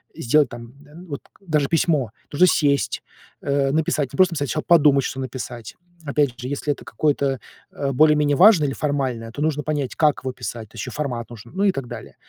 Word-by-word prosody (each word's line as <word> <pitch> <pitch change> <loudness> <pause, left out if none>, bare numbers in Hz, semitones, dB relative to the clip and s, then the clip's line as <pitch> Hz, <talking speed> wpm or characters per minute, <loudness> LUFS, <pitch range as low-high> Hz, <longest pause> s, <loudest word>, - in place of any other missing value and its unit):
э, - - -8
сделать, 145 +2 +3
там, 120 +1 -10
э, 150 +1 -17
вот 140 -3 -6 0.2
даже 155 -7 0
письмо. 155 - +1 0.2
Нужно 180 +5 +5
сесть, 140 -4 +1 0.4
э, 140 -1 +1
написать 150 -3 0
не - - -7
просто, 185 -2 +4
сначала 120 - -2
подумать, 145 -5 +5
что 135 - -4
написать. 125 -3 -6 0.3
Опять 140 -4 0
же, 125 - -5
если 145 +1 -1
это - - -14
какое-то, 140 -3 0 0.3
э, 140 -1 -2
более-менее 150 +1 +4
важное 175 -4 +6
или 135 - -2
формальное, 130 -6 -2
то 145 - -6
нужно 150 -1 0
понять, 145 -4 -2
как 150 -2 +2
его 130 -1 -3
писать, 115 -3 -6
то - - -20
еще - - -5
формат 125 -6 -4
нужен, 115 0 -12
ну 195 - 0
и 200 - +4
так 135 -6 -5
далее. - - -9
140 Hz, 200 wpm, -22 LUFS, 125-150 Hz, 0.4 s, важное